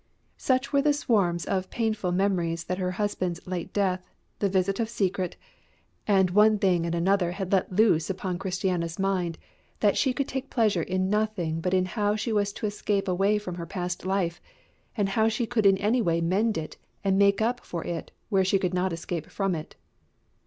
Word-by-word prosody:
Such 260 +2 0
were 280 - +4
the 295 +1 +3
swarms 195 -11 +1
of 185 -1 -1
painful 220 -5 -1
memories 175 -3 0
that 180 +2 -3
her 180 -1 0
husband's 185 -4 -2
late 185 0 -4
death, 190 -3 0 0.4
the 200 - +1
visit 190 +2 +1
of 225 -1 0
Secret, 190 -5 -1 0.7
and 190 -3 +4
one 210 +2 +5
thing 180 -4 +2
and 170 - -1
another 180 0 +2
had 190 -1 -4
let 190 -1 +2
loose 185 -5 +3
upon 185 -1 -3
Christiana's 180 -3 -2
mind, 185 -4 0 0.4
that 205 -2 +3
she 265 - +2
could 265 +2 -2
take 265 +1 -4
pleasure 215 -7 +2
in 185 +3 -1
nothing 205 -7 0
but 180 +2 +1
in 185 0 +2
how 205 +1 0
she 220 +1 -2
was 205 -1 +1
to - - -5
escape 205 -1 -1
away 195 +3 +2
from 205 -4 -5
her 170 - -6
past 180 0 -4
life, 185 -2 -1 0.6
and 200 -2 +1
how 220 +3 +2
she 225 +2 -1
could 220 -3 +2
in 195 -1 +5
any 220 +5 +2
way 170 -5 +1
mend 195 +6 +1
it 155 -1 -6 0.3
and 195 0 +2
make 200 0 +4
up 240 +3 +1
for 170 -2 -5
it 170 -1 -4 0.2
where 195 -3 +3
she 190 +1 +3
could 185 -1 -1
not 185 +1 +1
escape 165 -1 -4
from 195 -2 -1
it. 155 -2 -6
190 Hz, 195 wpm, -27 LUFS, 180-210 Hz, 0.7 s, one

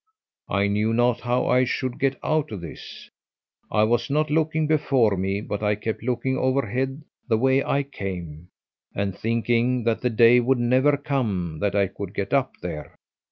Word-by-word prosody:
I 100 0 +1
knew 105 +2 +1
not 120 0 +2
how 120 +1 0
I 125 0 +3
should 130 0 -2
get 135 -1 +1
out 155 -3 0
of 100 -5 -6
this. 85 - -10 0.6
I 105 - +3
was 120 +3 +1
not 150 +1 0
looking 155 0 +1
before 135 -8 +2
me, 95 +2 -1
but 105 -1 -4
I 105 0 +1
kept 110 +1 -4
looking 125 +2 -1
overhead 130 +2 -1 0.2
the 115 -3 +2
way 130 +3 +3
I 140 - 0
came 90 - -7 0.5
and 100 -2 -2
thinking 120 +2 0
that 115 -1 0
the 125 - +1
day 115 +1 +6
would 125 +2 +2
never 130 +4 +3
come 105 - -2
that 100 -1 -1
I 100 -1 +3
could 100 +1 -7
get 100 -1 -3
up 135 -2 +1
there. 80 -4 -6
120 Hz, 175 wpm, -24 LUFS, 100-130 Hz, 0.6 s, day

